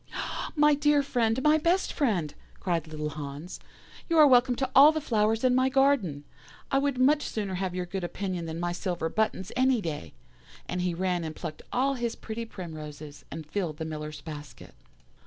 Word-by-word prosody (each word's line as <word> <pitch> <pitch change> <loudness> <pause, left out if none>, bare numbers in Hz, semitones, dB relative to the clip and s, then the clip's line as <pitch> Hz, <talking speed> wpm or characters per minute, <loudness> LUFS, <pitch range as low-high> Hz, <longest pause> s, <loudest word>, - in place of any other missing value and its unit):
"'My 300 -1 +5
dear 290 0 +3
friend, 245 -2 0
my 305 +1 +5
best 345 +4 +1
friend,' 190 - 0 0.3
cried 170 -4 -1
little 150 -1 -4
Hans, 145 +3 -7 0.5
'you 330 - +2
are 305 - +9
welcome 250 -2 +5
to 265 +1 -1
all 285 +3 +9
the 315 - -2
flowers 225 -4 +1
in 255 -1 +4
my 255 +1 +3
garden. 265 - +2 0.5
I 270 - +4
would 280 -2 0
much 285 +4 +4
sooner 205 -7 -3
have 185 -1 -2
your 180 -1 -2
good 185 +1 -5
opinion 180 -1 -3
than 160 +1 -5
my 175 0 -1
silver 175 -2 -2
buttons, 215 -2 -1
any 260 -1 +3
day'; 150 - -5 0.5
and 180 - -2
he 180 -1 -1
ran 180 -1 0
and 155 -1 -5
plucked 155 - -6
all 270 +2 +2
his 240 -3 -2
pretty 230 +1 -6
primroses, 155 -7 -9
and 160 +1 -7
filled 160 -1 -3
the 160 - -4
Miller's 150 -1 -6
basket. 150 -3 -10
195 Hz, 185 wpm, -28 LUFS, 160-260 Hz, 0.5 s, are